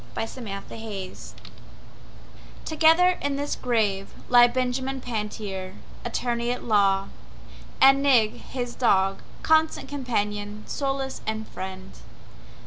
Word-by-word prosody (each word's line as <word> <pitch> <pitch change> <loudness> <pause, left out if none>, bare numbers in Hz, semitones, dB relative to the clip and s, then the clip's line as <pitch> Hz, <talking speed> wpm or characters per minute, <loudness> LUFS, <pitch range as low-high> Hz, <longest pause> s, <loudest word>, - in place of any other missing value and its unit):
Benjamin 225 -4 -5
Pantier 205 -4 -6 1.5
Together 325 +3 +4
in 285 -1 -1
this 285 +1 -2
grave 210 -5 -1
lie 245 -1 +8
Benjamin 260 +2 -1
Pantier, 210 -5 -5 0.3
attorney 240 0 -1
at 245 - -2
law, 195 -3 +2 0.7
And 270 +1 +7
Nig, 245 -6 +4
his 245 -2 -5
dog, 195 -5 +2 0.2
constant 315 0 +2
companion, 210 -6 -3
solace 270 -1 -3
and 220 0 -2
friend. 190 0 -7
235 Hz, 100 wpm, -25 LUFS, 205-270 Hz, 1.5 s, lie